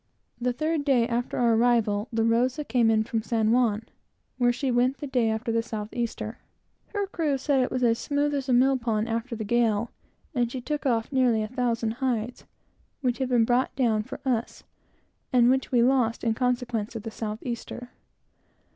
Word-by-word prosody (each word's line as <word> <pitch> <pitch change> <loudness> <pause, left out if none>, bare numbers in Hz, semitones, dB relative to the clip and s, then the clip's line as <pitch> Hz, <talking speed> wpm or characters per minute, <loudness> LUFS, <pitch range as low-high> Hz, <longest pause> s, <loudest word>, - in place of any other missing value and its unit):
The 250 +1 0
third 310 +4 -1
day 255 -5 +3
after 240 0 -2
our 235 -2 +3
arrival, 225 -2 +2
the 225 -1 +1
Rosa 245 +6 +1
came 245 -5 +2
in 220 -1 +3
from 225 0 -2
San 220 -1 +1
Juan, 230 -3 +2 0.6
where 245 -1 +4
she 255 +2 -1
went 250 +3 +2
the - - -6
day 250 -5 +1
after 220 +1 -2
the 230 0 +1
south 215 -2 -5
easter. 235 -1 -4 0.5
Her 405 -1 -2
crew 320 -7 -1
said 275 +1 +1
it 255 - 0
was 255 -1 -2
as 230 -1 +3
smooth 290 0 0
as 275 -1 -2
a - - +3
mill 260 +2 +4
pond, 225 -2 -1
after 230 +2 -3
the 220 - -4
gale, 230 0 +1 0.4
and 240 -3 0
she 260 - -4
took 290 +3 -3
off 230 -1 0
nearly 250 -5 +2
a - - -3
thousand 235 -2 -1
hides, 245 -2 -2 0.6
which 250 -2 0
had 260 -1 -1
been 240 -3 +4
brought 245 +2 +1
down 230 -5 +2
for 215 - -8
us, 240 -3 -2 0.7
and 245 -1 +5
which 265 0 0
we 240 -2 +4
lost 245 -3 +2
in 230 -2 +2
consequence 245 -2 -1
of 220 - -5
the 225 - -5
south 215 -1 -4
easter. 245 0 -6
240 Hz, 195 wpm, -26 LUFS, 225-255 Hz, 0.7 s, and